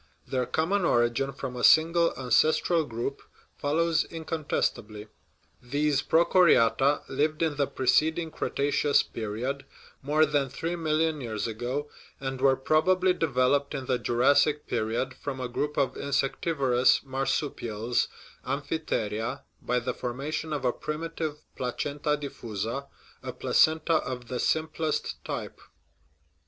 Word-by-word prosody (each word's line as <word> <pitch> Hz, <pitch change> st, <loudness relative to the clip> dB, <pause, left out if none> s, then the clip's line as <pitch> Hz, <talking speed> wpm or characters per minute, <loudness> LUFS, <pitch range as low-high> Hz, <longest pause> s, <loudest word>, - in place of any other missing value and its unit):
Their 125 Hz, -1 st, -1 dB
common 180 Hz, +5 st, 0 dB
origin 120 Hz, -2 st, +2 dB
from 135 Hz, -2 st, -6 dB
a 125 Hz, -, -5 dB
single 165 Hz, +1 st, +5 dB
ancestral 155 Hz, +6 st, +2 dB
group 120 Hz, +3 st, -4 dB, 0.3 s
follows 160 Hz, +2 st, +1 dB
incontestably. 145 Hz, -10 st, -3 dB, 0.5 s
These 145 Hz, +2 st, 0 dB
prochoriata 150 Hz, -4 st, +4 dB
lived 155 Hz, +4 st, 0 dB
in 160 Hz, -3 st, 0 dB
the 140 Hz, -1 st, +1 dB
preceding 160 Hz, +5 st, +1 dB
Cretaceous 145 Hz, 0 st, +1 dB
period 115 Hz, +6 st, -4 dB, 0.4 s
(more 150 Hz, +3 st, +3 dB
than 145 Hz, -3 st, 0 dB
three 165 Hz, +6 st, -3 dB
million 160 Hz, -2 st, 0 dB
years 110 Hz, -4 st, -3 dB
ago), 120 Hz, +6 st, -3 dB, 0.3 s
and 135 Hz, -1 st, -4 dB
were 135 Hz, -1 st, +5 dB
probably 180 Hz, +7 st, +2 dB
developed 140 Hz, -2 st, +1 dB
in 135 Hz, -1 st, -4 dB
the 125 Hz, -1 st, 0 dB
Jurassic 140 Hz, +5 st, +3 dB
period 115 Hz, +5 st, -1 dB
from 135 Hz, -2 st, -6 dB
a 125 Hz, -, -2 dB
group 145 Hz, +4 st, -3 dB
of 135 Hz, -, +1 dB
insectivorous 135 Hz, -2 st, +1 dB
marsupials 130 Hz, -4 st, -1 dB, 0.4 s
(amphitheria) 135 Hz, -4 st, -2 dB, 0.2 s
by 125 Hz, -, 0 dB
the 125 Hz, +1 st, -3 dB
for 120 Hz, -1 st, -4 dB
mation 155 Hz, +4 st, -4 dB
of 145 Hz, -3 st, -2 dB
a 125 Hz, -, +2 dB
primitive 155 Hz, -1 st, -4 dB
placenta 145 Hz, +4 st, -2 dB
diffusa, 120 Hz, -2 st, -5 dB, 0.3 s
a -, -, -5 dB
placenta 160 Hz, +1 st, +3 dB
of 125 Hz, -5 st, -5 dB
the 125 Hz, -, -3 dB
simplest 160 Hz, 0 st, -1 dB
type. -, -, -6 dB
140 Hz, 120 wpm, -27 LUFS, 125-155 Hz, 0.5 s, single